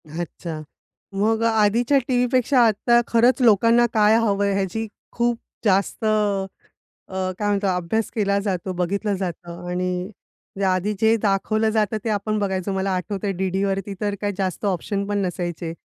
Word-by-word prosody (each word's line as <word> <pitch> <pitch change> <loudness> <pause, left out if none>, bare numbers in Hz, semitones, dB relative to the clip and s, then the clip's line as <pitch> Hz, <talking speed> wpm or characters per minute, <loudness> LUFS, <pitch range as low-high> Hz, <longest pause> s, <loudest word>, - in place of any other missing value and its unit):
अच्छा! 160 0 -6 0.5
मग 220 +3 +1
आधीच्या 230 +4 +3
टीव्हीपेक्षा 250 +1 +2
आता 235 +3 +3
खरंच 240 +3 +3
लोकांना 230 +1 +5
काय 215 0 +5
हवंय 200 -3 +1
ह्याची 195 +3 -2 0.2
खूप 240 0 0 0.3
जास्त 195 +2 +1
अ, 210 -2 +1 0.6
अ, 185 0 -2
काय 210 - 0
म्हणतो 200 -1 +1
अभ्यास 180 +5 -1
केला 200 -2 +1
जातो, 190 -2 -2
बघितलं 195 +4 -1
जातं 175 -2 -6
आणि 180 +1 -2 0.5
या 190 -2 +2
आधी 190 +3 -1
जे 220 0 +5
दाखवलं 215 +2 +1
जातं 215 -1 0
ते 230 - -2
आपण 215 0 -1
बघायचो. 190 -1 -1
मला 190 0 -1
आठवतंय 200 +2 -3
डी-डीवरती 195 +1 -1
तर 205 -1 -1
काय 205 -1 0
जास्त 190 +1 -2
ऑप्शन 200 +1 -1
पण 205 0 -1
नसायचे. 175 -2 -4
200 Hz, 145 wpm, -22 LUFS, 185-220 Hz, 0.6 s, लोकांना